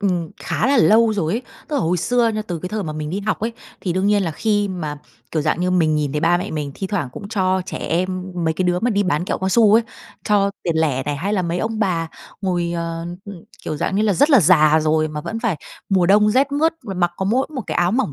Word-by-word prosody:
ừm, 180 -5 -1
khá - - -1
là 280 0 +3
lâu 220 +1 +5
rồi 170 -5 -1
ấy. 235 +3 -2 0.3
Tức 295 - -1
là - - +1
hồi 175 +2 +1
xưa 240 +6 +2
nha, 215 -1 -2
từ 175 -2 -3
cái 180 +3 -5
thời 215 0 -3
mà 155 -3 -4
mình 150 0 -5
đi 195 +3 -2
học 215 +1 -1
ấy, 230 +1 -2 0.3
thì 180 - -2
đương 185 +2 0
nhiên 205 -1 +3
là 170 - -1
khi 205 +5 0
mà 155 -6 -4 0.3
kiểu 155 -2 -1
dạng 160 +2 0
như, 180 0 +1
mình 160 -4 +2
nhìn 150 -2 -1
thấy 150 - -1
ba 170 +2 +3
mẹ 180 - -4
mình 150 -3 -4
thi 190 - -4
thoảng 185 -9 -2
cũng 200 - -8
cho 190 -3 +1
trẻ - - -5
em, 185 +2 -1 0.2
mấy 160 0 +1
cái 185 - -1
đứa 180 0 +1
mà 245 - +1
đi 205 -2 +2
bán 175 -3 0
kẹo - - -2
cao 190 - -1
su 215 0 +5
ấy, 230 - +5 0.4
cho 200 -1 +2
tiền 165 -2 -1
lẻ 145 -5 +1
này, 145 +1 -3
hay 195 +8 -2
là 190 -3 +1
mấy 170 +1 -2
ông 220 +2 -2
bà 175 -6 0 0.3
ngồi, 175 -2 -1
ờ, 165 0 -4 0.2
ừm, 195 -4 -10 0.2
kiểu 155 - -3
dạng 190 - -1
như 210 - +2
là, 215 -2 +3
rất 285 - +3
là 270 -6 +7
già 155 -2 +5
rồi 155 0 +1
mà 150 0 -5
vẫn 225 +8 -5
phải 225 -9 0 0.3
mùa 185 -3 +3
đông 210 +2 +5
rét 270 +5 +2
mướt 320 +3 +2
mà 195 -4 -5
mặc 175 -1 +1
có 190 - -2
mỗi 245 +7 +1
một 260 - -2
cái - - -3
áo 175 +1 +2
mỏng 240 - 0
185 Hz, 280 wpm, -20 LUFS, 165-210 Hz, 0.4 s, là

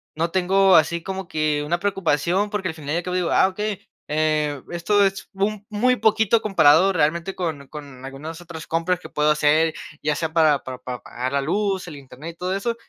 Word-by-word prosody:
no 165 +2 -1
tengo 190 +1 +4
así 165 +2 +3
como 190 +1 -6
que 155 -1 0
una 170 +3 -1
preocupación 190 0 0
porque 205 -3 -2
al 160 - -3
final 150 -2 -5
y 170 - +1
al 175 - -2
cabo, 180 +1 -3
digo: 180 -2 0
"Ah, 190 - +5
okey, 210 +1 -4 0.3
eh, 150 -2 0
esto 200 +4 +2
es 195 0 -3
un 205 +1 -2
muy 250 +4 +2
poquito 220 0 +2
comparado, 180 -3 +5
realmente, 170 +2 0
con 155 -6 -4
con 140 -4 -10
algunas 150 +5 -8
otras 170 -2 -9
compras 165 +2 0
que - - -10
puedo 150 0 +1
hacer, 150 +2 +3 0.3
ya 150 0 +1
sea 160 -1 -3
para 155 -4 +4
para 130 -1 -6
para 125 -1 -6
pagar 125 +1 -5
la 140 - +1
luz, 190 +4 -1
el 155 - -8
internet 140 +4 -10
y - - -32
todo 180 +1 -2
eso". 230 +4 -2
170 Hz, 210 wpm, -22 LUFS, 150-195 Hz, 0.3 s, Ah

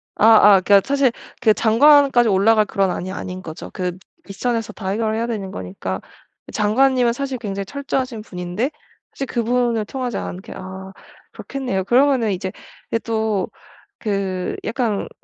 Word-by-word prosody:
아 - - +3 0.3
아 185 - 0
그러니까 200 +1 +5
사실 275 -3 +3 0.3
그 220 -4 +5
장관까지 250 +1 +5
올라갈 215 +2 +4
그런 195 -1 0
안이 185 +1 -4
아닌 185 -1 -6
거죠. 160 0 -8
그 180 -2 -3 0.3
윗선에서 225 +2 -2
다 190 -2 -5
해결해야 220 +2 -1
되는 200 -5 -4
거니까 95 - -5 0.5
장관님은 245 +3 +3
사실 270 0 -3
굉장히 200 -3 -4
철저하신 260 -3 -3
분인데 180 - -3 0.4
사실 275 - -4
그분을 235 -2 0
통하지 250 -1 -4
않게 190 +6 -6
아 190 +1 -8 0.4
그렇겠네요. 250 -9 -3
그러면은 250 -1 +3
이제 185 0 -3 0.4
예 230 - +2
또 220 -4 -1 0.5
그 195 -4 -2
약간 225 -3 -1
220 Hz, 325 characters per minute, -20 LUFS, 190-245 Hz, 0.5 s, 그러니까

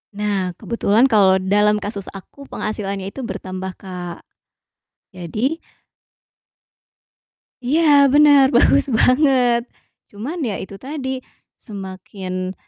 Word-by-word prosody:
Nah, 200 -3 -2
kebetulan 230 +1 +1
kalau 195 -3 +5
dalam 205 +2 +1
kasus 205 -2 -5
aku, 275 +8 -12
penghasilannya 200 -2 -4
itu 265 +2 -7
bertambah, 185 -3 -6
Kak, 180 -2 -8 0.9
jadi 215 - -3 2.0
Iya 290 +2 +4
bener, 285 -2 +6
bagus 240 - +4
banget. 250 -1 +3 0.5
Cuman 245 - -6
ya 210 -5 -3
itu 195 +1 -9
tadi, 265 +1 -5 0.4
semakin, 185 -2 -7
210 Hz, 95 wpm, -20 LUFS, 190-260 Hz, 2.0 s, bener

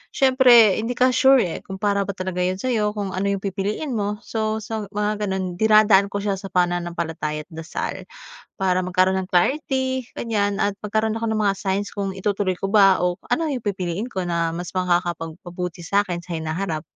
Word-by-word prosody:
siyempre 250 -6 +6
hindi 235 +2 -2
ka 255 0 +4
sure 265 0 +5
eh, 170 - -4
kung 190 - -6
para 200 -1 +1
ba 200 - -2
talaga 185 -1 -4
'yon 185 +1 -1
sa'yo, 215 -5 0
kung 200 -2 -2
ano 190 +2 -2
'yong 200 -1 -1
pipiliin 205 - -3
mo. 205 0 -2
So 220 -1 -1
so 215 0 -4
sa 200 - -19
mga 210 0 -1
gano'n, 185 -2 -3
dinadaan 215 -2 +5
ko - - 0
siya 200 -1 -1
sa 195 -1 -8
pananampalataya 170 -4 -1
at - - -65
dasal. 160 0 -5 0.5
Para 185 -1 +1
magkaroon 185 +1 +2
ng 185 - -8
clarity 260 - +1
ganiyan, 205 -3 0
at 205 0 +1
magkaroon 220 +1 0
ako 230 - -3
ng 220 - 0
mga 200 -1 +2
signs 200 +1 -2
kung 200 -1 -2
itutuloy 195 -1 -1
ko 195 - -3
ba, 195 -3 +6
o 180 0 0
ano 325 -1 +1
'yong 250 -4 -4
pipiliin 195 +2 -2
ko 190 -1 -2
na 170 -1 0
mas 175 0 -5
makakapagpabuti 175 -1 -2
sa'kin 185 -2 0
sa 175 - -7
hinaharap. 160 0 -3
195 Hz, 190 wpm, -22 LUFS, 180-215 Hz, 0.5 s, siyempre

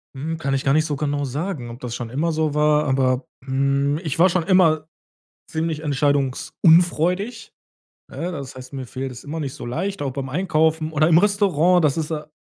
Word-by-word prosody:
Mhm. 160 +4 -4
Kann 140 -4 -2
ich 135 - 0
gar 135 - +2
nicht 155 +1 +3
so 150 -2 -2
genau 145 0 -1
sagen, 145 -1 -4
ob 120 +2 -9
das 120 -2 -5
schon 120 -2 -5
immer 155 +7 -1
so 155 -2 0
war, 150 0 +3
aber, 130 +1 +1 0.2
hm, 140 +2 +1
ich 155 -1 -3
war 185 +2 +6
schon 175 -1 0
immer 160 -5 +3 0.6
ziemlich 160 -1 -2
entscheidungsunfreudig, 165 - +1 0.6
ne? 175 +2 -4
Das 140 -4 -7
heißt, 130 +1 -11
mir 135 -2 -6
fällt 130 +2 -5
es 125 - -11
immer 160 +3 -5
nicht 135 -3 -4
so - - -8
leicht, 190 +10 -3
auch 135 -2 -2
beim 135 -1 -4
Einkaufen 160 -1 +1
oder 155 +1 +3
im 165 0 +6
Restaurant, 180 -4 +3
das 145 0 +2
ist 160 0 -2
a 150 -1 -5
150 Hz, 200 wpm, -22 LUFS, 135-165 Hz, 0.6 s, war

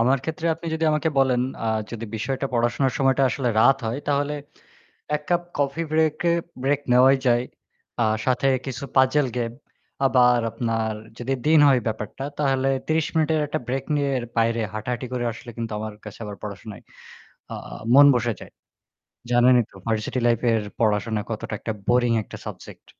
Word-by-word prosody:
আমার 130 +4 +3
ক্ষেত্রে 160 +2 -3
আপনি 165 +1 -10
যদি 160 0 -1
আমাকে 150 +2 +1
বলেন, 130 -2 +3 0.2
আ - - 0 0.2
যদি 115 -1 -5
বিষয়টা 135 +4 -2
পড়াশোনার 120 +3 +1
সময়টা 135 0 +3
আসলে 130 -2 -1
রাত 135 +4 +6
হয়, 115 +5 -2
তাহলে 145 +1 +1 0.8
১ 150 - -4
কাপ 175 0 +2 0.2
কফি 145 +3 0
ব্রেক 155 -1 +2 0.2
এ - - +3 0.3
ব্রেক 140 +1 +2
নেওয়াই 130 +2 +6
যায়। 120 0 +3 0.6
আ - - +4 0.2
সাথে 130 +1 +1 0.2
কিছু 130 -1 -5
পাজল 130 +2 +4
গেম 115 -1 -1 0.5
আবার 125 -2 +5
আপনার 115 -1 -1 0.3
যদি 125 +2 -1
দিন 155 0 +6
হয় 130 -2 +5
ব্যাপারটা 110 +4 -4 0.2
তাহলে 135 -2 +1 0.2
৩০ 160 -1 +1
মিনিটের 160 0 +2
একটা - - -2
ব্রেক 130 +1 -2
নিয়ে 140 -1 0 0.3
বাইরে 115 0 +2
হাঁটাহাঁটি 120 +4 -4
করে 120 -1 -1
আসলে 120 +2 -10
কিন্তু 115 -1 -4
আমার 110 0 -5
কাছে 105 - -9
আবার 105 -1 -6
পড়াশোনায় 105 0 -8 0.7
আ - - -4 0.4
মন 140 +2 +9
বসে 120 -1 0
যায়। - - -12 0.8
জানেনই 120 0 +5
তো - - -24
ভার্সিটি 110 +3 -1
লাইফ 120 -1 +2
এর 115 -1 +1 0.2
পড়াশোনা 110 0 +1
কতটা 110 -1 -4
একটা 110 - -4 0.2
বোরিং 120 -1 +3
একটা - - -10
সাবজেক্ট। - - -10
125 Hz, 165 wpm, -24 LUFS, 115-140 Hz, 0.8 s, মন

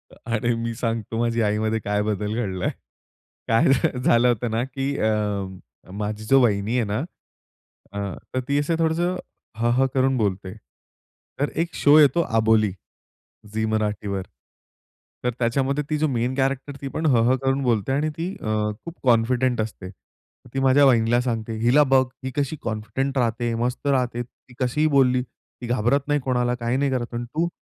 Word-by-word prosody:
अरे 120 0 -1
मी 115 0 -3
सांगतो 115 -1 -3
माझ्या 115 -2 +1
आईमध्ये 110 +1 0
काय 105 -1 -1
बदल 105 0 -2
घडला 95 -6 -2
आहे. - - +1 0.8
काय 115 0 +3 0.4
झालं 120 -1 +4
होतं 120 -1 0
ना 115 +2 0
की 135 +1 -3
अं, 105 -3 -1 0.3
अ, - - -12
माझी 105 +2 -4
जो 135 +5 +5
वहिनी 105 -1 +1
आहे 120 - +2
ना, 105 +2 -2 0.9
अ, 100 - -4 0.4
तर - - +2
ती 140 0 +2
असं 150 +3 0
थोडंसं 170 +3 +1 0.4
हं, 120 +1 +1
हं, 135 +2 +3
करून 130 0 +2
बोलते. 95 -4 -1 0.9
तर 145 - +1
एक 170 - -9
शो 145 +1 +5
येतो 150 +2 +5 0.2
अबोली. 110 -2 +3 0.8
झी 110 0 0
मराठीवर. 105 -2 -1 1.0
तर 125 - +2
त्याच्यामध्ये 135 +4 0
ती 155 - +1
जो 155 +1 +1
मेन 125 -1 -1
कॅरेक्टर 135 +1 -1
ती 140 - -3
पण 160 +4 -2
हं, 120 -6 +4
हं, 130 - +4
करून 135 +1 +1
बोलते 120 -2 +1
आणि 145 +3 +1
ती 175 +4 -3
अ, - - -7 0.4
खूप 170 - -7
कॉन्फिडंट 125 0 +2
असते. 105 -4 -5
तर 95 - -25
ती - - -1
माझ्या 135 +2 +5
वाहिनीला 120 -1 +4
सांगते, 115 -2 -3
"हिला 120 +6 +4
बघ 130 -1 +4 0.2
ही 130 - -2
कशी 145 +1 -1
कॉन्फिडंट 125 +5 -2
राहते, 120 -1 0
मस्त 125 +4 -2
राहते. 125 -3 +1
ती 125 +1 -19
कशीही 130 +5 +1
बोलली. 125 -2 +4
ती 125 0 -14
घाबरत 120 +3 +2
नाही 145 0 +2
कोणाला 125 -2 0
काही 120 +2 0
नाही 140 +1 +1
करत. 125 -2 -3
अन् 120 0 -3
तू, 155 +8 -1
120 Hz, 175 wpm, -23 LUFS, 110-135 Hz, 1.0 s, जो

